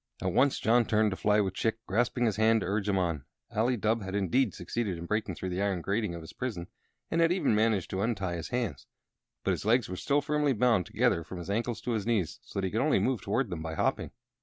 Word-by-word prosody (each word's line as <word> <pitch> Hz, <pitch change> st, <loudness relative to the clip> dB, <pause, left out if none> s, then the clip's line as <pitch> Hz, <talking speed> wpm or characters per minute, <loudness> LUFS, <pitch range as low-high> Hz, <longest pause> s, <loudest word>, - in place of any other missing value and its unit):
At 95 Hz, -1 st, -1 dB
once 135 Hz, +5 st, +3 dB
John 120 Hz, +1 st, +3 dB
turned 110 Hz, -1 st, +2 dB
to -, -, -2 dB
fly, 105 Hz, +2 st, +3 dB
with 95 Hz, -2 st, -1 dB
Chick 110 Hz, +3 st, 0 dB
grasping 120 Hz, +4 st, +1 dB
his 110 Hz, -3 st, 0 dB
hand 110 Hz, 0 st, +4 dB
to -, -, -2 dB
urge 100 Hz, +2 st, -1 dB
him 100 Hz, -, +2 dB
on. 85 Hz, -6 st, -1 dB, 0.3 s
Ali 120 Hz, +3 st, +1 dB
Dubh 110 Hz, +2 st, +1 dB
had 95 Hz, 0 st, -5 dB
indeed 100 Hz, +7 st, +2 dB
succeeded 105 Hz, -7 st, -3 dB
in 85 Hz, -, -6 dB
breaking 105 Hz, -1 st, -1 dB
through 95 Hz, -, -4 dB
the 90 Hz, +2 st, -2 dB
iron 100 Hz, -3 st, 0 dB
grating 100 Hz, -1 st, -1 dB
of 85 Hz, -, -7 dB
his 80 Hz, -, -11 dB
prison, 110 Hz, -9 st, -4 dB, 0.5 s
and 165 Hz, -, +2 dB
had 165 Hz, 0 st, +4 dB
even 180 Hz, -9 st, +2 dB
managed 105 Hz, -3 st, +1 dB
to 95 Hz, -, -1 dB
untie 100 Hz, -5 st, -1 dB
his 80 Hz, -2 st, -6 dB
hands. 115 Hz, -, -3 dB, 0.6 s
But -, -, +1 dB
his -, -, -2 dB
legs 115 Hz, +1 st, +2 dB
were 90 Hz, -, -4 dB
still 140 Hz, +9 st, +1 dB
firmly 150 Hz, -2 st, +1 dB
bound 110 Hz, -6 st, +2 dB
together 85 Hz, -, +1 dB
from 95 Hz, -, -8 dB
his 85 Hz, +3 st, -5 dB
ankles 115 Hz, +1 st, -1 dB
to 125 Hz, -, -3 dB
his 110 Hz, -2 st, -1 dB
knees, 105 Hz, -9 st, 0 dB
so -, -, -6 dB
that 95 Hz, -, 0 dB
he 95 Hz, -, -2 dB
could 110 Hz, -, 0 dB
only 150 Hz, +2 st, +3 dB
move 130 Hz, -6 st, 0 dB
toward 105 Hz, +3 st, -1 dB
them 85 Hz, -2 st, -4 dB
by 80 Hz, 0 st, -4 dB
hopping. -, -, 0 dB
105 Hz, 255 wpm, -29 LUFS, 95-120 Hz, 0.6 s, hand